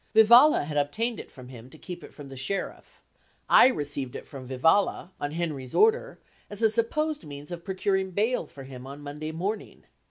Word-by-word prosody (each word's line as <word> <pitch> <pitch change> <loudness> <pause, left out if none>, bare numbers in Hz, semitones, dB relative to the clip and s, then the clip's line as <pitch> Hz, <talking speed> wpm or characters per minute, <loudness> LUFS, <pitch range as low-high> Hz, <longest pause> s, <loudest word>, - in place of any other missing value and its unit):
Vivalla 235 - +7
had 150 0 -4
obtained 220 +12 -1
it - - -9
from 125 -1 -13
him 125 -1 -11
to - - -14
keep 175 -1 -9
it - - -11
from 145 -2 -11
the 135 - -9
sheriff; 180 +9 -5 0.4
I - - +8
received 145 - -3
it - - -7
from 135 -3 -10
Vivalla, 160 +8 +2
on 145 - -1
Henry's 150 -7 -4
order, 460 +3 +3 0.3
as 205 +2 -1
a 220 - +5
supposed 300 +7 0
means 145 +2 -10
of 170 -1 -6
procuring 190 0 -1
bail 215 +7 0
for 135 - -11
him 130 -1 -10
on 140 +2 -9
Monday 150 +2 -6
morning. 195 +6 -4
170 Hz, 190 wpm, -27 LUFS, 140-220 Hz, 0.4 s, I